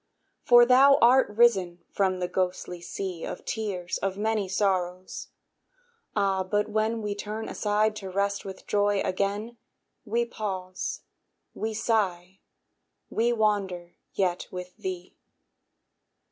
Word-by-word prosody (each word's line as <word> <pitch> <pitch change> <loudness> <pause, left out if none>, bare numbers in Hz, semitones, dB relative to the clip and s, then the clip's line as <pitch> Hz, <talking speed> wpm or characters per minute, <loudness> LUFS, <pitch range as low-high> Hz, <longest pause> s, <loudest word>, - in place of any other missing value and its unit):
For 240 -1 +7
thou 270 +3 +7
art 250 +1 +5
risen 200 -6 +3
from 190 -2 +1
the 180 -1 -2
ghostly 180 -1 -2
sea 180 -1 -5
Of - - -6
tears 195 -6 -3
of 195 0 -2
many 215 -2 0
sorrows. 185 -2 -1 0.9
Ah! 195 -2 +2
but 205 +2 0
when 220 +1 0
We 205 -1 -1
turn 210 +2 -5
aside 215 +1 +1
to 195 -2 -6
rest 200 +1 -1
with 190 -1 -9
Joy 205 -1 +2
again, 205 +5 -2 0.5
We 235 +1 0
pause, 190 -5 -4 0.5
we 220 0 -3
sigh, 195 -5 -1 0.7
we 235 +2 +2
wander 200 -6 0 0.2
yet 180 -2 0
with 180 0 -8
thee. 185 -3 -6
200 Hz, 120 wpm, -27 LUFS, 185-220 Hz, 0.9 s, For